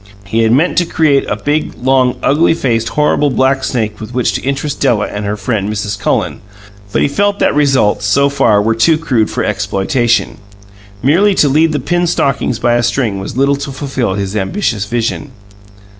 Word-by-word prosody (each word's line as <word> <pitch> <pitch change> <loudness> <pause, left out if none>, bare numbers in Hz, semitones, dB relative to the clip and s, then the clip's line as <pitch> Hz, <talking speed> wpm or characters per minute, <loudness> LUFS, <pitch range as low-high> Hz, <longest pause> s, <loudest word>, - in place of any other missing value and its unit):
He 110 +3 -1
had 110 -1 +2
meant 155 +9 +2
to 175 - 0
create 150 -5 +1
a - - 0
big, 145 +8 -2
long, 130 -1 +2
ugly 160 +3 +3
faced 115 -6 -1
horrible 150 -1 +1
black 130 +1 +1
snake 110 -4 -2
with 110 +3 -8
which 125 - 0
to - - -3
interest 140 +2 -3
Della 120 -6 +1
and 105 0 -5
her 105 +1 -2
friend, 105 -1 -2
Mrs. 105 -1 -3
Cullen; 100 - -1 0.5
but - - +1
he - - +3
felt 200 +8 0
that - - +1
results, 135 -8 +2
so 140 +7 +3
far, 115 -7 +2
were 115 +1 +1
too 120 +8 +3
crude 125 -9 0
for - - -2
exploitation. 105 +5 -1 0.6
Merely 190 +9 +3
to 150 - +3
lead 155 +4 +2
the 150 - -1
pinned 175 +6 0
stockings 135 -6 0
by 120 +1 +1
a 120 - +2
string 115 -4 -1
was 100 +4 -7
little 140 +1 +2
to 140 0 -6
fulfill 130 -7 -3
his 100 0 -3
ambitious 105 - -1
vision. 120 +5 -3
125 Hz, 190 wpm, -14 LUFS, 110-145 Hz, 0.6 s, ugly